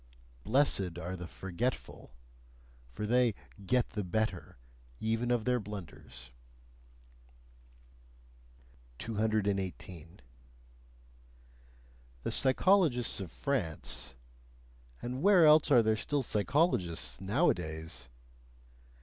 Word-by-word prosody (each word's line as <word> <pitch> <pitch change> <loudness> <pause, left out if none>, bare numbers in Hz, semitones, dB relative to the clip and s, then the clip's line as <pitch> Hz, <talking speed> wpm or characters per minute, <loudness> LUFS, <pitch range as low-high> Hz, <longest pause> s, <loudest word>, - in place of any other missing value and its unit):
Blessed 105 - +1
are 90 +1 -5
the 90 -2 -7
forgetful: 95 - -5 0.8
for 105 - -4
they 120 -1 +3 0.3
"get 125 +5 +1
the 105 -1 -3
better" 95 - -2 0.4
even 115 +2 -1
of 120 -3 +1
their 125 -1 +2
blunders. 85 - -9 2.7
218. 100 - -2 2.0
The - - -2
psychologists 135 - +3
of 95 -4 -5
France 105 - -3 0.9
and 125 +2 -4
where 190 -3 +6
else 155 0 +6
are 125 -5 +6
there 110 0 +2
still 140 +5 -1
psychologists 105 - 0
nowadays? 80 - -1
110 Hz, 80 wpm, -32 LUFS, 90-125 Hz, 2.7 s, where